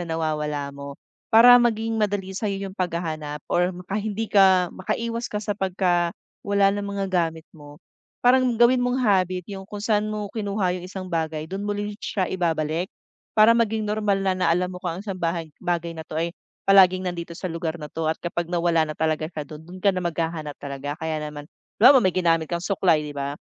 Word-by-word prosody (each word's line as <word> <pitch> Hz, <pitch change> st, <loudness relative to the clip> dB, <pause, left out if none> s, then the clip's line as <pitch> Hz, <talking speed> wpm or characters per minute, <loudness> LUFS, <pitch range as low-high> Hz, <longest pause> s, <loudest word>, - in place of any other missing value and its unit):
na 165 Hz, -2 st, -3 dB
nawawala 150 Hz, -3 st, -2 dB
mo. 140 Hz, 0 st, -9 dB, 0.3 s
Para 245 Hz, +2 st, +8 dB
maging 225 Hz, -1 st, 0 dB
madali 205 Hz, -2 st, -1 dB
sa'yo 195 Hz, -1 st, -3 dB
yung 190 Hz, -, -16 dB
paghahanap 160 Hz, -4 st, -3 dB
or 180 Hz, +1 st, +1 dB
maka 180 Hz, +3 st, -4 dB
hindi 215 Hz, +1 st, -3 dB
ka, 190 Hz, -3 st, +5 dB
makaiwas 230 Hz, +5 st, -3 dB
ka 210 Hz, 0 st, -4 dB
sa 210 Hz, -, -4 dB
pagka 180 Hz, -3 st, 0 dB, 0.3 s
wala 200 Hz, -1 st, +4 dB
ng 205 Hz, 0 st, -3 dB
mga 200 Hz, -1 st, -2 dB
gamit 165 Hz, -3 st, 0 dB
mo. 145 Hz, +1 st, -15 dB, 0.4 s
Parang 255 Hz, +1 st, +5 dB
gawin 240 Hz, +2 st, +5 dB
mong 245 Hz, +1 st, 0 dB
habit 185 Hz, -4 st, +2 dB
yung 195 Hz, -1 st, -7 dB
kung 205 Hz, -1 st, -7 dB
saan 210 Hz, -1 st, +1 dB
mo 210 Hz, -1 st, -4 dB
kinuha 200 Hz, -4 st, -1 dB
yung 175 Hz, -, -9 dB
isang 185 Hz, -1 st, -7 dB
bagay, 160 Hz, -1 st, -2 dB
do'n 195 Hz, +2 st, -4 dB
mo 205 Hz, -, -1 dB
rin 205 Hz, 0 st, -3 dB
siya 190 Hz, -5 st, -2 dB
ibabalik. 165 Hz, -1 st, -1 dB, 0.5 s
Para 215 Hz, +1 st, +7 dB
maging 225 Hz, -2 st, +2 dB
normal 210 Hz, -2 st, 0 dB
na 190 Hz, -1 st, +2 dB
na 180 Hz, -, +1 dB
alam 180 Hz, +1 st, -1 dB
mo 180 Hz, -, -7 dB
kung 175 Hz, -2 st, -3 dB
ang -, -, -8 dB
isang 195 Hz, -3 st, -5 dB
bahay 165 Hz, -2 st, -2 dB
bagay 170 Hz, -2 st, -2 dB
na 160 Hz, -, -7 dB
'to, -, -, -9 dB
eh, 165 Hz, +2 st, -1 dB, 0.3 s
palaging 185 Hz, -1 st, +5 dB
nandito 170 Hz, -2 st, -5 dB
sa 185 Hz, +1 st, -5 dB
lugar 165 Hz, 0 st, -3 dB
na 150 Hz, -, -7 dB
'to 160 Hz, -1 st, -3 dB
at 160 Hz, -, +2 dB
kapag 175 Hz, -1 st, -2 dB
nawala 170 Hz, -2 st, +1 dB
na 155 Hz, -, -5 dB
talaga 155 Hz, 0 st, 0 dB
siya 155 Hz, -3 st, -6 dB
do'n, 150 Hz, +1 st, -10 dB
do'n 185 Hz, +1 st, -10 dB
ka 200 Hz, -, +5 dB
na 185 Hz, -, -3 dB
maghahanap 160 Hz, -3 st, -3 dB
talaga. 140 Hz, +1 st, -5 dB
Kaya 160 Hz, -1 st, -2 dB
naman, 150 Hz, -1 st, -7 dB, 0.3 s
halibawa 265 Hz, +2 st, +9 dB
may 185 Hz, -7 st, +1 dB
ginamit 165 Hz, -3 st, +2 dB
kang 170 Hz, +1 st, -3 dB
suklay, 175 Hz, -6 st, +2 dB
'di 150 Hz, -, -6 dB
ba? 140 Hz, +1 st, -3 dB
180 Hz, 205 wpm, -24 LUFS, 160-205 Hz, 0.5 s, halibawa